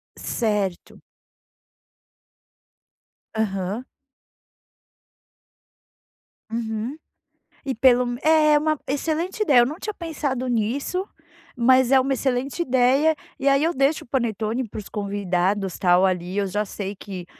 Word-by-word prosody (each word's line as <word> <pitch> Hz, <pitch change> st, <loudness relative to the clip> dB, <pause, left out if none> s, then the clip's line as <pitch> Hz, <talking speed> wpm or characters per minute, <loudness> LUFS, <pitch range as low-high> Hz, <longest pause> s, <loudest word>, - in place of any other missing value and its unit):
Certo. 205 Hz, -6 st, -2 dB, 2.4 s
Aham. 205 Hz, +2 st, -2 dB, 2.7 s
Uhum. 225 Hz, +4 st, -3 dB, 0.7 s
E 270 Hz, -, -1 dB
pelo 250 Hz, +1 st, +4 dB
m 245 Hz, 0 st, -4 dB
É 310 Hz, -1 st, +5 dB
uma 310 Hz, -1 st, 0 dB
excelente 320 Hz, +8 st, -2 dB
ideia, 280 Hz, -10 st, +5 dB
eu 240 Hz, -, +6 dB
não 295 Hz, +6 st, -4 dB
tinha 425 Hz, -, -4 dB
pensado 285 Hz, -6 st, -3 dB
nisso, 255 Hz, -, -1 dB, 0.5 s
mas 255 Hz, +1 st, +4 dB
é 270 Hz, -, +7 dB
uma 270 Hz, +1 st, +1 dB
excelente 265 Hz, +4 st, -1 dB
ideia, 265 Hz, +3 st, +3 dB, 0.2 s
e 275 Hz, -, -1 dB
aí 275 Hz, +1 st, +4 dB
eu 335 Hz, +2 st, +1 dB
deixo 275 Hz, +3 st, +1 dB
o -, -, -27 dB
panetone 235 Hz, -1 st, -1 dB
para -, -, -9 dB
os 205 Hz, -, -9 dB
convidados, 195 Hz, -2 st, -1 dB
tal, 180 Hz, +1 st, +4 dB
ali. 180 Hz, +1 st, -1 dB
Eu 200 Hz, -, +1 dB
já 205 Hz, +3 st, -1 dB
sei 200 Hz, 0 st, -5 dB
que, 190 Hz, -3 st, -8 dB
245 Hz, 120 wpm, -23 LUFS, 205-280 Hz, 2.7 s, é